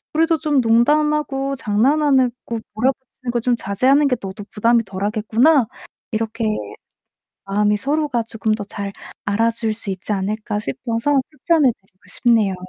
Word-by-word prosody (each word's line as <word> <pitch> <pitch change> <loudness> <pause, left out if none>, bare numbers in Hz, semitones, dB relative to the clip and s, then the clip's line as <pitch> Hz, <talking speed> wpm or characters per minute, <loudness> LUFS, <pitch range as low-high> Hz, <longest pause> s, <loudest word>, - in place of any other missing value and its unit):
우리도 325 +1 +3
좀 295 -4 +2
농담하고 275 +3 +2
장난하는 260 +4 +2
거 230 - -3 0.2
몰아붙이는 255 +2 -2
거 240 - 0
좀 245 +1 +1
자제하는 260 +8 +2
게 250 - +1
너도 195 +1 -7
부담이 230 +2 +3
덜하겠구나." 215 +8 +2 0.5
이렇게 225 +1 -2 1.0
마음이 210 +1 +1
서로가 280 0 0
조금 220 -1 -2
더 215 - -3
잘 200 -1 -5 0.3
알아줄 225 +2 0
수 215 -2 -7
있지 190 +2 -5
않을까 210 +2 -2
싶어서 230 - 0
추천해 305 -3 +2
드리고 190 -1 -37
싶네요. 225 -6 +2
230 Hz, 325 characters per minute, -20 LUFS, 210-275 Hz, 1.0 s, 우리도